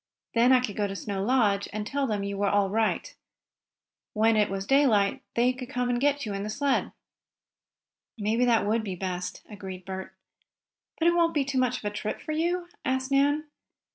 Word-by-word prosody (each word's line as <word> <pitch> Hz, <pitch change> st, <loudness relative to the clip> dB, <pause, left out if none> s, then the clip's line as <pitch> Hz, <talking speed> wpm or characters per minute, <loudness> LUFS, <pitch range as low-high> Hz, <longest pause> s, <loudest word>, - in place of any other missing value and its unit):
Then 240 Hz, +2 st, +4 dB
I 255 Hz, -1 st, +6 dB
could 215 Hz, -5 st, -4 dB
go 205 Hz, -1 st, 0 dB
to 195 Hz, -, -5 dB
Snow 195 Hz, -1 st, -3 dB
Lodge 210 Hz, -4 st, +2 dB
and 210 Hz, 0 st, -4 dB
tell 275 Hz, +4 st, -1 dB
them 210 Hz, -3 st, -1 dB
you 200 Hz, 0 st, -3 dB
were 200 Hz, 0 st, +1 dB
all 200 Hz, -1 st, +2 dB
right. 225 Hz, -, 0 dB, 1.0 s
When 225 Hz, +1 st, +3 dB
it 210 Hz, -1 st, +3 dB
was 195 Hz, 0 st, -3 dB
daylight 230 Hz, -7 st, +3 dB
they 245 Hz, +2 st, +3 dB
could 255 Hz, -1 st, -8 dB
come 250 Hz, -3 st, 0 dB
for 280 Hz, +3 st, +2 dB
you 210 Hz, -, -3 dB
in 195 Hz, -, -3 dB
the 210 Hz, -, -4 dB
sled." 280 Hz, +4 st, 0 dB, 1.3 s
"Maybe 220 Hz, +3 st, +1 dB
that 235 Hz, -3 st, +3 dB
would 220 Hz, +2 st, +1 dB
be 195 Hz, -4 st, -4 dB
best," 180 Hz, 0 st, -4 dB
agreed 190 Hz, -3 st, -8 dB
Bert. 190 Hz, 0 st, -6 dB, 0.8 s
"But 340 Hz, +1 st, +4 dB
won't 335 Hz, -1 st, +3 dB
it -, -, -17 dB
be 285 Hz, -2 st, +2 dB
too 270 Hz, -1 st, 0 dB
much 255 Hz, -1 st, +1 dB
of -, -, -10 dB
a 205 Hz, -, 0 dB
trip 210 Hz, +1 st, -4 dB
for 310 Hz, -, -6 dB
you?" 345 Hz, +3 st, 0 dB, 0.2 s
asked 260 Hz, +1 st, -1 dB
Nan. 290 Hz, +2 st, +3 dB
225 Hz, 200 wpm, -27 LUFS, 200-270 Hz, 1.3 s, I